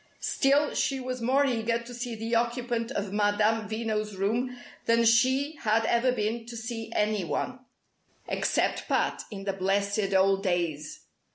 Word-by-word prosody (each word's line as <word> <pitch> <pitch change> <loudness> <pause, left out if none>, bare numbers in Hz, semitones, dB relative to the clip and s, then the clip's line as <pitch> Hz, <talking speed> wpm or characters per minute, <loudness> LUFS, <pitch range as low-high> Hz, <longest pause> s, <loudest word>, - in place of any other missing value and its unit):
Still, 285 +2 +2
she 270 -1 0
was 255 -1 -4
more 265 +4 +3
eager 230 -3 0
to 235 +1 -9
see 240 -1 -4
the 225 +2 -4
occupant 235 0 0
of 200 -5 -3
Madame 210 +1 +2
Veno's 215 -2 -2
room 235 +6 -1 0.3
than 230 0 +4
she 260 +6 +3
had 225 -2 +1
ever 235 +3 +3
been 225 0 -2
to 235 -1 -7
see 225 0 -5
any 210 -2 +1
one 255 +9 -3 0.7
except - - 0
Pat, - - 0
in 195 -3 -7
the 195 0 -1
blessed 200 +1 0
old 195 +1 +4
days. 170 -6 -2
225 Hz, 155 wpm, -28 LUFS, 205-245 Hz, 0.7 s, than